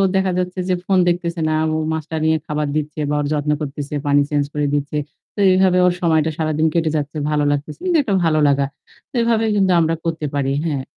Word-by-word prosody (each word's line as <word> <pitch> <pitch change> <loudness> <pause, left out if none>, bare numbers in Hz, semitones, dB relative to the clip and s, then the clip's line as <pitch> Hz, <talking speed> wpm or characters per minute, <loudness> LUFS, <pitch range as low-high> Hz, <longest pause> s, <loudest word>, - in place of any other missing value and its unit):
দেখা 190 -1 +2
যাচ্ছে 180 +1 -3
যে - - +3
ফোন 195 - +2
দেখতেছে 170 -1 -1
না। - - +1 0.2
ও - - 0 0.2
মাছটা 160 0 -4
নিয়ে 160 0 +3
খাবার 150 0 -1
দিচ্ছে 155 0 -3
বা 150 - 0
ওর 145 - -1
যত্ন 150 0 0
করতেছে 145 0 -5
পানি 145 0 +4
চেঞ্জ 145 -1 +1
করে 150 -1 0
দিচ্ছে। 145 +1 -1 0.4
তো - - -7
এভাবে 185 -1 +3
ওর 180 - +3
সময়টা 160 -2 +2
সারাদিন 155 0 +1
কেটে 165 -2 +1
যাচ্ছে, 150 +1 -4
ভালো 150 -1 +1
লাগতেছে। 145 +1 -3
কিন্তু 355 -2 +3
একটা 200 - -1
ভালো 155 -1 +2
লাগা। 140 0 +2 0.4
তো - - -73
এভাবে 230 -1 +2
কিন্তু 190 -2 +3
আমরা 165 0 +1
করতে 165 -2 -2
পারি, 135 -1 0
হ্যাঁ। 145 -5 -1
155 Hz, 215 wpm, -19 LUFS, 150-175 Hz, 0.4 s, পানি